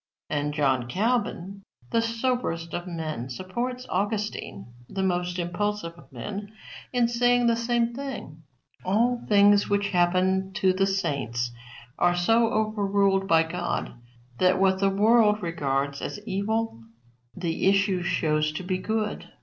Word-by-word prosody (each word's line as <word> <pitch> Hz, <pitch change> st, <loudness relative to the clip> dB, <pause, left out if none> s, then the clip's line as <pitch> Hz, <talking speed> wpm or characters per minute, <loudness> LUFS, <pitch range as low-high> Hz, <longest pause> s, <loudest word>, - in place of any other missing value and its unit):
And 150 Hz, 0 st, 0 dB
John 135 Hz, -5 st, +1 dB
Calvin, 200 Hz, -, -1 dB, 0.3 s
the 230 Hz, -, +3 dB
soberest 230 Hz, -8 st, -2 dB
of 175 Hz, +1 st, -4 dB
men, 155 Hz, -7 st, -4 dB
supports 240 Hz, -, -4 dB
Augustine, 195 Hz, -, -3 dB, 0.2 s
the 195 Hz, -, -2 dB
most 180 Hz, -1 st, -1 dB
impulsive 180 Hz, +1 st, -2 dB
of 150 Hz, -6 st, -18 dB
men, 200 Hz, -, -6 dB, 0.4 s
in 245 Hz, -2 st, +2 dB
saying 245 Hz, +1 st, +3 dB
the 235 Hz, -1 st, +4 dB
same 235 Hz, 0 st, 0 dB
thing. 245 Hz, -, -7 dB, 0.4 s
All 235 Hz, +6 st, +1 dB
things 205 Hz, 0 st, +5 dB
which 200 Hz, 0 st, +1 dB
happen 185 Hz, +1 st, +2 dB
to 190 Hz, -1 st, +2 dB
the 195 Hz, +1 st, +2 dB
saints 135 Hz, -, -1 dB, 0.5 s
are 175 Hz, 0 st, +3 dB
so 225 Hz, +6 st, +3 dB
overruled 200 Hz, -3 st, +1 dB
by 165 Hz, -3 st, +5 dB
God 175 Hz, +2 st, -3 dB, 0.5 s
that 185 Hz, 0 st, +3 dB
what 190 Hz, 0 st, +3 dB
the 195 Hz, 0 st, +3 dB
world 210 Hz, +1 st, +4 dB
regards 140 Hz, -4 st, -1 dB
as -, -, -4 dB
evil 215 Hz, -, -2 dB, 0.5 s
the 170 Hz, 0 st, -1 dB
issue 195 Hz, -2 st, +2 dB
shows 155 Hz, -3 st, +1 dB
to 170 Hz, -, -5 dB
be 185 Hz, 0 st, -1 dB
good. 215 Hz, +1 st, -2 dB
190 Hz, 135 wpm, -26 LUFS, 170-215 Hz, 0.5 s, things